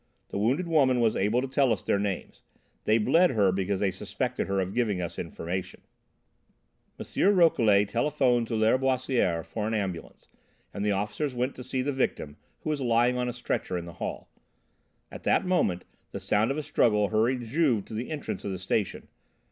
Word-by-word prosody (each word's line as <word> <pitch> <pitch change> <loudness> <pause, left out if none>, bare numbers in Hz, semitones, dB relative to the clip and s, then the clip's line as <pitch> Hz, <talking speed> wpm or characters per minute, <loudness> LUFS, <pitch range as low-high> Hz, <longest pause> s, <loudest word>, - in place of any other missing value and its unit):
The - - -3
wounded 135 - +1
woman 135 -6 +3
was 115 -2 +2
able 105 +6 +1
to 135 - -3
tell 135 -1 +2
us 105 - -1
their 100 - +1
names. 100 -2 -4 0.4
They 110 - +4
'bled' 165 +11 +4
her 100 -3 +4
because 95 +1 -1
they 100 -2 +2
suspected 95 - -3
her 100 0 0
of 95 +1 -2
giving 110 -6 0
us 85 -1 -5
information." 90 +2 -5 1.2
M. 200 +1 +1
Rouquelet 110 - +4
telephoned 120 0 +1
to 115 - -2
Lâriboisière 125 - +1
for 105 -1 -4
an 110 - -1
ambulance, 95 -5 -5 0.5
and 100 - -4
the 105 - +1
officers 105 +8 -2
went 125 +2 -1
to 125 - -9
see 130 +1 -2
the 145 - -1
victim, 80 - -2 0.2
who 155 - -2
was 145 -2 -2
lying 120 0 +3
on 125 0 -1
a - - -1
stretcher 120 -6 -3
in 85 - -5
the 85 - -9
hall. - - -4 0.8
At - - -9
that - - +2
moment, 155 - +1 0.3
the - - -4
sound 105 +2 +1
of 135 - -1
a 155 - -2
struggle 105 -6 +2
hurried 120 +4 +1
Juve 125 -5 +1
to - - -11
the 115 +3 -4
entrance 155 -2 -5
of - - -3
the 95 - -3
station. 95 +2 -2
115 Hz, 190 wpm, -27 LUFS, 100-130 Hz, 1.2 s, They